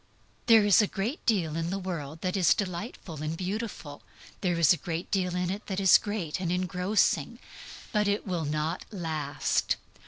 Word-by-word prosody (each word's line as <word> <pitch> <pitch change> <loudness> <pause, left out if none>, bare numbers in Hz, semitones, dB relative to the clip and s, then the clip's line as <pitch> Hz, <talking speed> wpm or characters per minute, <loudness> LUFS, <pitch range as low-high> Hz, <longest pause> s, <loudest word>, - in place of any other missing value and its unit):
There 225 -3 +7
is 205 +1 +6
a 210 - +2
great 215 - -3
deal 175 -9 +1
in 165 0 -2
the 195 - -2
world 165 -5 -5
that 185 +1 -1
is 185 -4 +4
delightful 180 - -5
and 155 +1 -3
beautiful; 190 -6 -5 0.4
there 175 -3 +1
is 165 0 +6
a - - -2
great 165 0 -5
deal 180 -2 0
in 180 0 0
it 205 +2 -6
that 190 -1 -2
is 190 -2 +7
great 205 -7 -3
and 175 -2 -2
engrossing; 180 +3 +1 0.5
but 210 -1 +2
IT 205 +1 0
WILL 175 -5 -2
NOT 155 +3 -2
LAST. 155 -7 -1
180 Hz, 180 wpm, -28 LUFS, 165-200 Hz, 0.5 s, There